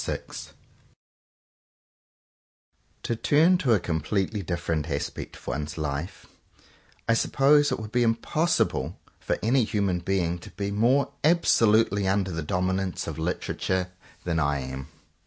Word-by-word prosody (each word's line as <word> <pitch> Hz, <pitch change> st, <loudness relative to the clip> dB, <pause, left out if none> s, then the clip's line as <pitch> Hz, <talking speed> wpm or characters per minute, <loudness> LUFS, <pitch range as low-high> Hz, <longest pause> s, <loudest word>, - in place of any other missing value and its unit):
7S -, -, -2 dB, 0.3 s
VI -, -, -20 dB, 2.5 s
To 115 Hz, -, -1 dB
TURN 160 Hz, +9 st, +4 dB
to 130 Hz, -9 st, +3 dB
a 105 Hz, -, +3 dB
completely 95 Hz, +6 st, -1 dB
different 85 Hz, -3 st, -2 dB
aspect 70 Hz, -1 st, -4 dB
of -, -, -16 dB
one's 75 Hz, +4 st, -4 dB
life; 75 Hz, +2 st, -4 dB, 0.8 s
I 115 Hz, -, +4 dB
suppose 145 Hz, +5 st, +3 dB
it -, -, -1 dB
would 110 Hz, -1 st, -7 dB
be 120 Hz, -, +2 dB
impossible 120 Hz, +9 st, 0 dB, 0.2 s
for -, -, -1 dB
any 125 Hz, +3 st, +3 dB
human 100 Hz, -5 st, 0 dB
being 90 Hz, -1 st, -1 dB
to -, -, -11 dB
be 100 Hz, +3 st, -4 dB
more 120 Hz, +7 st, +2 dB
absolutely 115 Hz, -, +3 dB
under 95 Hz, -1 st, +1 dB
the 80 Hz, -1 st, -3 dB
dominance 95 Hz, +2 st, -1 dB
of 80 Hz, -2 st, -5 dB
Literature 90 Hz, +2 st, -2 dB, 0.3 s
than 85 Hz, -2 st, 0 dB
I 70 Hz, -2 st, +1 dB
am. 65 Hz, +1 st, -6 dB
95 Hz, 135 wpm, -26 LUFS, 85-115 Hz, 2.5 s, TURN